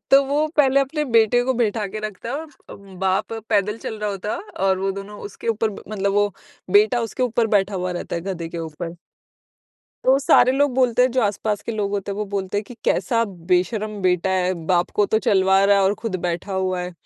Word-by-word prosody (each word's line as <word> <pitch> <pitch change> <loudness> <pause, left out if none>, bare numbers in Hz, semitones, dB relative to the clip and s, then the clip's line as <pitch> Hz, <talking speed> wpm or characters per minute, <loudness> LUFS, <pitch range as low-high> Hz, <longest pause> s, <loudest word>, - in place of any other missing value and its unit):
तो 275 +1 +7
वो 290 +3 +1
पहले 275 -2 +5
अपने 300 +3 -1
बेटे 235 -2 +3
को 260 +1 +1
बैठा 220 -3 0
के 205 +2 -6
रखता 215 +1 -6
है - - -2
और 320 +2 -7 0.2
अ, - - -8
बाप 190 0 -2 0.2
पैदल 210 0 +1
चल 220 - -6
रहा 210 0 -2
होता 200 +1 -4
है - - -5 0.3
और 190 -1 +2
वो 195 +1 -1
दोनों 200 +1 -8
उसके 205 +3 -7
ऊपर 225 0 +1
ब 200 - -10
मतलब 200 -2 -1
वो 205 0 +2 0.4
बेटा 215 +5 +4
उसके 230 +2 -3
ऊपर 235 -2 +1
बैठा 195 0 0
हुआ 185 -1 -2
रहता 175 - -4
है - - -3
गधे 175 -3 -4
के 170 - -6
ऊपर। 165 +1 -6 1.1
तो 265 +1 +5
सारे 255 -2 +5
लोग 285 0 +2
बोलते 250 -2 +3
हैं 255 - +3
जो 255 - +2
आस-पास 210 0 -1
के 230 - -4
लोग 210 -2 -2
होते 200 0 -3
हैं - - -6
वो 210 - -2
बोलते 190 0 -2
हैं 210 - -4
कि 245 - -11
कैसा 230 -2 +1 0.3
बेशर्म 210 +3 0
बेटा 180 0 +2
है, 185 -1 +1
बाप 175 -1 +2
को 205 - +3
तो 220 - +2
चलवा 190 -1 +3
रहा 200 0 +5
है 200 - +3
और 195 +2 +2
खुद 225 -5 -2
बैठा 175 +3 -3
हुआ 185 -1 -1
है। 180 0 -5
205 Hz, 230 wpm, -22 LUFS, 190-230 Hz, 1.1 s, तो